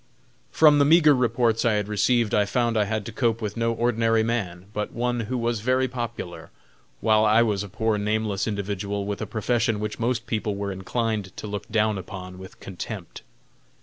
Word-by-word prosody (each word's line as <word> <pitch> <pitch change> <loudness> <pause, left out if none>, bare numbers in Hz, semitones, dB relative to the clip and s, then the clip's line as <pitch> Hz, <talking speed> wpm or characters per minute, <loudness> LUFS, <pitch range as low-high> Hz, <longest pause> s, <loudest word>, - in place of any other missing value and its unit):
From 150 - +6
the 145 - +5
meagre 155 0 +6
reports 120 -3 +1
I 115 - +3
had 105 -1 0
received 105 +2 +1
I 105 -1 +3
found 120 +2 0
I 105 -1 +2
had 110 0 -2
to 115 - -6
cope 115 0 0
with 105 -2 -4
no 115 0 0
ordinary 115 -1 +1
man, 95 -6 -2
but 105 - -3
one 120 0 -1
who 115 +3 -2
was 120 -1 -1
very 130 +4 +1
popular, 115 -8 -6 0.5
while 110 -1 +4
I 110 +2 +5
was 105 -4 0
a 100 - -6
poor 110 +2 0
nameless 105 -1 -1
individual, 100 -1 -3
with 100 +1 -4
a 110 - -3
profession 110 +1 0
which 105 +2 -4
most 120 0 -1
people 105 -2 -2
were 100 0 -3
inclined 105 +1 -3
to - - -6
look 105 -1 -5
down 110 -2 +1
upon 90 0 -8
with 95 0 -12
contempt. 95 -3 -7
110 Hz, 190 wpm, -25 LUFS, 100-120 Hz, 0.5 s, From